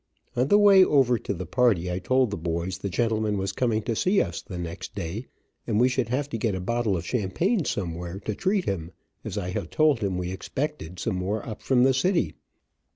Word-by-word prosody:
On 125 +2 +2
the 205 - +5
way 200 -2 +7
over 130 -8 +3
to - - -4
the 95 -1 -4
party 100 -5 +2
I 90 - -2
told 130 +4 +2
the - - -1
boys 85 +2 -3
the 100 - -3
gentleman 110 +1 0
was 95 0 -1
coming 115 -4 0
to 115 - -1
see 185 - +2
us 85 -3 -1
the 90 - -8
next 85 -1 -6
day, 95 +10 -4 0.4
and 110 -2 +1
we 125 +2 +5
should 125 -3 -1
have 135 +3 0
to 115 - -4
get 105 -3 0
a - - -3
bottle 110 0 0
of 85 - -5
champagne 145 - 0
some 90 -5 -2
where, 85 +2 -6
to 110 - -3
treat 190 - 0
him, 90 -3 -3 0.3
as - - -5
I 90 - -2
had - - -3
told 155 -5 +3
him 100 -4 -1
we 90 0 -3
expected, 130 - -4
some 90 +2 -2
more 100 +3 -2
up 110 - -6
from 125 -2 +3
the 135 +1 +5
city. 135 - +1
110 Hz, 225 wpm, -26 LUFS, 90-130 Hz, 0.4 s, way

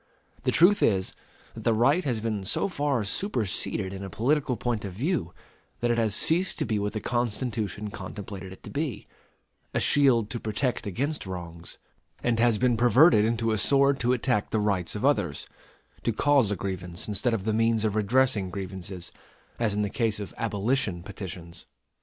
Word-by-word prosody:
The - - +3
truth 190 +5 +5
is, 95 -4 +2 0.4
that - - -9
the 115 - +3
right 140 +11 +3
has 120 -5 0
been 110 -3 -2
so 95 - 0
far 145 - 0
superseded 105 - -1
in 95 0 -6
a 95 - -5
political 130 - 0
point 120 -1 -2
of 100 -3 -5
view, 130 - -1 0.5
that 120 0 +1
it 120 - +1
has 110 -3 +1
ceased 175 +9 +1
to - - -1
be 110 -2 0
what 105 0 -2
the 110 - -2
Constitution 110 -3 -2
contemplated 100 -3 -7
it 95 - -13
to - - -9
be, 140 -8 -3 0.7
a - - +3
shield 125 -7 +3
to 120 - -3
protect 110 +2 -1
against 140 - -2
wrongs; 85 -2 -7 0.5
and 120 -2 +1
has 115 -2 +4
been 120 0 +2
perverted 120 +1 +6
into 115 0 +1
a 110 - +1
sword 140 +2 +4
to 120 +1 +1
attack 125 -3 +1
the 110 - 0
rights 100 -4 0
of 105 - -2
others 105 - +1 0.5
to - - 0
cause 135 -1 +3
a 105 - 0
grievance 90 -2 -4
instead 105 +3 0
of 100 - -4
the 110 +1 0
means 115 0 +2
of 105 -1 0
redressing 110 -2 +2
grievances, 95 -1 -6 0.5
as 110 -3 +1
in 105 - +1
the - - 0
case 115 -3 0
of 100 - -6
abolition 105 -3 -1
petitions. 85 -3 -9
110 Hz, 185 wpm, -27 LUFS, 100-125 Hz, 0.7 s, perverted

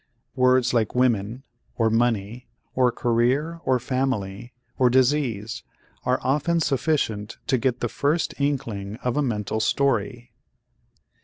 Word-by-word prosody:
Words 130 -1 +3
like 115 -2 +1
women 120 -1 +1 0.3
or 115 -1 +2
money 115 0 0 0.3
or 125 -1 +3
career 130 +9 0
or 130 - +3
family 120 -4 -2 0.3
or 125 -1 +5
disease 120 -4 +1 0.4
are 125 +1 +2
often 150 +5 +1
sufficient 125 -7 -1
to 130 -3 +1
get 125 0 0
the 120 - +1
first 150 +7 0
inkling 110 -8 -2
of 125 -1 0
a 150 - +2
mental 110 -5 -2
story. 125 0 0
125 Hz, 125 wpm, -24 LUFS, 115-135 Hz, 0.4 s, or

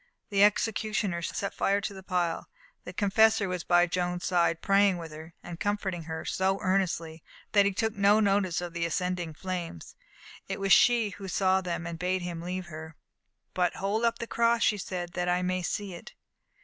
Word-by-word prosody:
The 200 0 +4
executioner 210 -3 +1
set 200 +4 -3
fire 200 +1 +1
to 210 0 -4
the 190 - -9
pile. 180 -3 -2 0.4
The - - -6
confessor 215 0 +3
was 180 -2 -3
by 175 0 +4
Joan's 180 0 -2
side, 170 -2 +2
praying 195 -2 +3
with 165 -2 -8
her, 160 +2 -11 0.2
comforting 195 -5 -2
her 160 0 -5
so 190 +1 0
earnestly, 170 -4 -1 0.3
that 200 -1 +5
he - - +1
took 220 +3 -1
no 200 +1 +4
notice 195 -4 +1
of 175 -1 -6
the 170 -1 -1
ascending 180 -1 -2
flames. 175 - -5 0.5
It - - -4
was 195 -1 +4
she 235 -3 +5
who 195 +1 -8
saw 190 0 +2
them 175 -2 -4
and 170 -1 -6
bade 180 +1 -1
him 170 -2 -5
leave 180 +1 -4
her. 160 -1 -9 0.6
"But 180 -1 +1
hold 205 +4 -1
up 230 0 +2
the 235 - -4
cross," 235 0 +2
she 210 - +2
said, 175 -2 -4
"that 180 0 -1
I 180 +1 +1
may 185 0 0
see 195 +2 -3
it." 170 - -11
185 Hz, 190 wpm, -28 LUFS, 175-200 Hz, 0.6 s, that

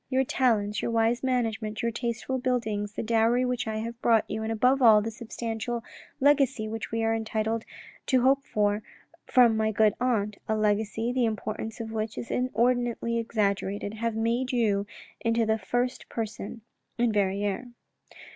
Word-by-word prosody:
Your 265 0 +2
talents: 225 -5 +1
your - - -1
wise 230 +1 +2
management, 225 -5 -1
your 235 - +1
tasteful 235 +2 -3
buildings, 220 -5 -1
the - - -3
dowry 230 +2 +2
which 250 -1 -2
I 220 - -2
have 230 +2 -5
brought 225 -2 +3
you, 220 - -3
and 220 0 -2
above 250 +5 +3
all, 220 -3 +8
the 220 +2 -3
substantial 235 0 -4 0.4
legacy 270 -5 +3
which 225 0 -5
we 225 0 -1
are 225 0 +2
entitled 220 0 -1 0.4
to 255 -2 +3
hope 270 +1 +4
for 210 -2 0 0.5
from 240 -3 +5
my 220 0 +1
good 215 0 +3
aunt, 210 -5 0
a 220 - +2
legacy, 215 +2 0
the 250 -2 +2
importance 220 0 -4
of 225 -1 -5
which 220 0 -3
is 235 - -5
inordinately 240 -1 +1
exaggerated, 205 -2 -1
have 230 0 -2
made 235 +4 0
you 205 -5 +1 0.3
into 230 -1 +1
the 220 0 +1
first 245 +5 -2
person 220 0 -5 0.4
in 235 -2 +2
Verrieres." 200 +3 0
225 Hz, 165 wpm, -27 LUFS, 215-245 Hz, 0.5 s, all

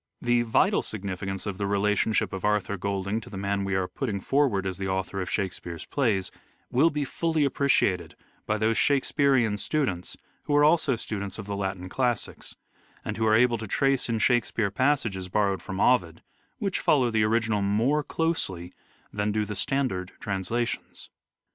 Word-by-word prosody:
The 120 0 +2
vital 115 -2 +2
significance 95 -1 -4
of 100 -2 -4
the 100 - -1
relationship 105 +1 +1
of 95 - -5
Arthur 105 -1 +1
Golding 100 +2 -2
to 110 - -12
the 100 - -7
man 100 0 -1
we 95 0 -1
are 95 -1 0
putting 110 -5 -3
forward 125 -5 +1
as 95 -1 -3
the 95 - -2
author 95 +1 -2
of 90 - -4
Shakespeare's 90 -4 -3
plays 105 -9 0 0.4
will 145 +7 +4
be 150 -2 -2
fully 160 +1 0
appreciated 135 -10 +1 0.3
by 110 - +1
those 110 +1 +1
Shakespearean 135 -5 +2
students 105 - -2 0.3
who 145 - +1
are 145 - +5
also 155 -3 +4
students 100 -3 -4
of 110 - -6
the 100 0 -4
Latin 95 -2 -3
classics, 120 +3 -2 0.5
and - - -3
who 110 0 +1
are 110 - +5
able 120 0 +3
to 110 - -6
trace 135 +5 +1
in 115 - +1
Shake 120 +2 +3
speare 105 -4 -1
passages 110 -7 0
borrowed 100 -1 +1
from 95 -1 -6
Ovid, 90 -11 +2 0.3
which 195 -2 -1
follow 130 -5 +3
the 110 -1 +2
original 110 -1 +1
more 115 +10 +2
closely 95 - -2 0.4
that 105 0 0
do 105 0 0
the 105 0 -5
standard 95 -4 -1
trans 95 -3 -3
lations. 120 0 -3
105 Hz, 175 wpm, -27 LUFS, 95-125 Hz, 0.5 s, are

